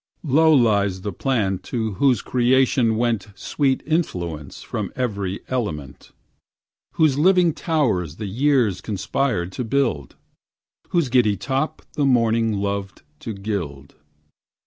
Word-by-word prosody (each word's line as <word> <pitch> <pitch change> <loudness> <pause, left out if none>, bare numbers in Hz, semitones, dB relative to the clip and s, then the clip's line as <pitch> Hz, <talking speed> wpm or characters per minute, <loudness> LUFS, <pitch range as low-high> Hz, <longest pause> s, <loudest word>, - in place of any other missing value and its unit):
Low 160 +2 +4
lies 100 -8 +3
the 100 0 -4
plant 100 -6 -1
to 110 -3 -2
whose 130 -6 +3
creation 125 -2 +2
went 115 -2 0
Sweet 135 +5 -1
influence 85 - -3
from - - -4
every 100 -6 -2
element; 75 - -4 0.8
Whose 150 -4 +2
living 180 0 +4
towers 115 - 0
the 105 - -6
years 115 -3 +1
conspired 100 -1 -1
to 125 - -4
build, 115 - -1 0.7
Whose 170 -7 +1
giddy 120 -5 +3
top 135 - -2
the 145 -3 0
morning 115 -3 +2
loved 100 -1 -3 0.2
to 115 - -5
gild. 90 -9 -5
115 Hz, 120 wpm, -22 LUFS, 95-135 Hz, 0.8 s, Low